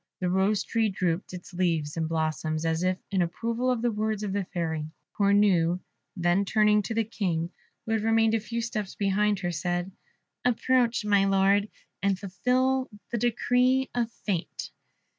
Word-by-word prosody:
The 180 -1 0
Rose 195 +2 +2
tree 225 -2 +1
drooped 180 -2 -1
its 180 0 -9
leaves 165 -5 0
and 160 -1 -1
blossoms, 155 0 -1
as 160 0 0
if 185 0 +1
in 190 -2 +2
approval 230 +8 -1
of 245 -2 0
the 240 - +2
words 215 0 -1
of 200 -2 -2
the 200 -2 -1
Fairy. 160 -4 -3 0.3
Cornue 200 -4 +3 0.4
then 175 +2 +2
turning 210 +1 +3
to 225 +2 -4
the 225 - +2
King, 180 -6 -2 0.3
who 225 - -4
had 220 -1 +1
remained 225 0 +3
a 225 - +3
few 230 +2 -4
steps 215 -4 -4
behind 205 +1 +1
her, 175 -2 -1
said, 175 +3 -2 0.5
"Approach, 245 -2 +2
my 200 -2 +4
Lord, 195 +1 +3 0.3
and 200 -1 +1
fulfil 255 +7 0 0.2
the 235 - -1
decree 250 +3 +2
of 240 -2 0 0.2
fate." 185 -5 -3
200 Hz, 165 wpm, -27 LUFS, 175-225 Hz, 0.5 s, my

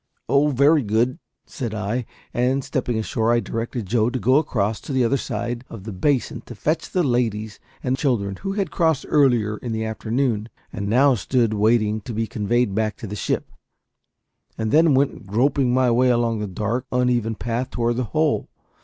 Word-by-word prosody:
"Oh, 140 +2 +3
very 145 +3 +4
good," 115 - 0 0.3
said 120 -10 -5
I; 110 +4 -2 0.3
and, 130 +3 +1
stepping 125 -5 -2
ashore, 110 +1 0
I 120 - +4
directed 115 0 -4
Joe 110 +3 +2
to 130 - -3
go 130 +4 +3
across 110 -8 0
to - - -7
the 130 -2 +2
other 115 - +2
side 120 -2 -3
of 115 -5 -9
the 110 - -6
basin 120 +4 0
to 120 - -8
fetch 155 +10 -1
the 180 - +1
ladies 110 -5 -1 0.2
and 130 0 +1
children, 120 -8 0
who 195 - -4
had 195 -5 -2
crossed 160 -5 +1
earlier 120 -8 +3
in 120 0 -5
the 110 0 -2
afternoon, 110 0 -1 0.2
and 100 -2 -4
now 130 +6 +4
stood 115 +1 +1
waiting 110 0 +2
to 115 - -7
be 115 +1 0
conveyed 110 0 0
back 110 0 -1
to - - -7
the 105 0 -5
ship, - - -2 1.1
and 110 -1 -2
then 160 -2 +5
went 130 -5 0
groping 125 +5 +2
my 130 -1 +3
way 125 +2 +3
along 120 -2 +1
the 105 - -3
dark, 110 +7 -2
uneven 125 -3 +1
path 120 +3 -3
toward 120 0 -1
the 125 - 0
hole. 155 +5 0
120 Hz, 190 wpm, -22 LUFS, 110-130 Hz, 1.1 s, then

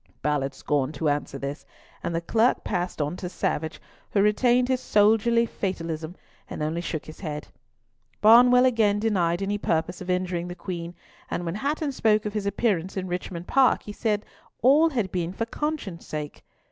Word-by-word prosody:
Ballard 140 -2 0
scorned 145 0 -1
to 150 +2 0
answer 145 -1 -2
this, 140 +2 -5 0.4
and 170 - -2
the 165 - 0
Clerk 225 +7 +2
passed 180 -1 -2
on 145 +4 -3
to 180 - -5
Savage, 160 -2 -2 0.3
who 200 - +2
retained 245 +4 +3
his 260 -1 +1
soldierly 225 +2 +3
fatalism, 170 -5 -4 0.3
and - - -4
only 160 +3 -1
shook 165 -3 -4
his 155 - -11
head. 150 -5 -5 0.7
Barnwell 245 +3 +7
again 220 -5 +3
denied 190 -5 +1
any 205 +1 -1
purpose 170 0 -1
of 185 - -7
injuring 180 -1 -1
the 175 - -6
Queen, 175 -1 -6 0.3
and 175 - -3
when 165 - -2
Hatton 285 - -1
spoke 215 -4 +2
of 210 - -3
his 210 -2 -2
appearance 195 -3 0
in 185 -1 -2
Richmond 180 -1 -4
Park, 265 +4 +3
he 210 - -7
said 210 -2 -1 0.4
all 295 +6 +6
had 230 - -2
been 175 -1 -2
for 230 - -2
conscience 255 - -4
sake. 150 -1 -6
185 Hz, 175 wpm, -25 LUFS, 165-225 Hz, 0.7 s, Barnwell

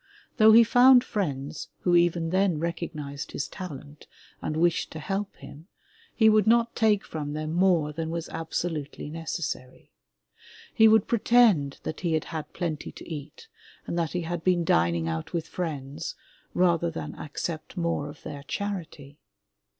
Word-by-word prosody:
Though 220 -1 +7
he 230 +2 +9
found 245 +2 +6
friends 145 - -3
who 175 -1 +3
even 170 -1 +2
then 190 -3 +2
recognized 155 -3 -5
his 140 - -3
talent 150 -6 -9 0.3
and 155 - -3
wished 170 +1 +2
to 160 - -6
help 195 +6 -3
him, 150 +4 -12 0.5
he 220 - +5
would 215 0 +5
not 235 +1 +3
take 215 -3 +2
from 145 -2 -5
them 155 +1 -3
more 170 -4 +2
than 160 +1 -3
was 165 0 -4
absolutely 160 -3 -4
necessary. 160 -5 -5 0.8
He 220 -4 +6
would 220 -2 +5
pre 235 - 0
tend 205 - +4
that 155 - -5
he 170 -3 -1
had 155 - +1
had 155 -2 -5
plenty 165 -4 -4
to - - -12
eat 155 - -8 0.4
and - - -4
that 165 -2 -1
he 180 - -1
had 170 0 -4
been 180 -2 +2
dining 85 - +2
out 80 -1 -4
with 165 -2 -2
friends, 150 -3 -5 0.4
rather 170 -2 +3
than 165 - -6
accept 155 +4 -6
more 170 -4 -1
of 145 - -13
their 145 - -7
charity. 155 -3 -5
165 Hz, 160 wpm, -27 LUFS, 150-190 Hz, 0.8 s, he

